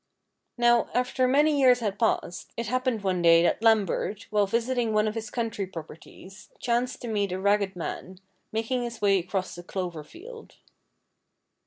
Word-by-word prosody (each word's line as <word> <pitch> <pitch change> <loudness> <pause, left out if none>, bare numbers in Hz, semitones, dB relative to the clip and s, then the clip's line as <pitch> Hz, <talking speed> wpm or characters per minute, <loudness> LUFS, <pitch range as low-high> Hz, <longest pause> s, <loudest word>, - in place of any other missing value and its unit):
Now, 240 -1 +3
after 250 +1 +1
many 290 +2 +3
years 250 -2 +6
had 210 -4 -3
passed, 220 -6 -1
it 235 - -2
happened 255 -1 -1
one 185 -2 0
day 165 0 +6
that 175 - +1
Lambert, 215 -2 +1
while 205 -1 +2
visiting 235 +1 0
one 215 0 +2
of 215 - -2
his 220 -1 -5
country 225 -5 -3
properties, 180 +3 -12
chanced 245 +1 -1
to - - -4
meet 205 -4 -1
a 185 - -3
ragged 200 -1 +1
man, 180 +2 -6 0.3
making 225 +3 -1
his 235 -1 -5
way 200 -2 +3
across 185 +1 -4
a - - -9
clover 175 -4 -5
field. 450 - -13
215 Hz, 165 wpm, -26 LUFS, 190-245 Hz, 0.3 s, years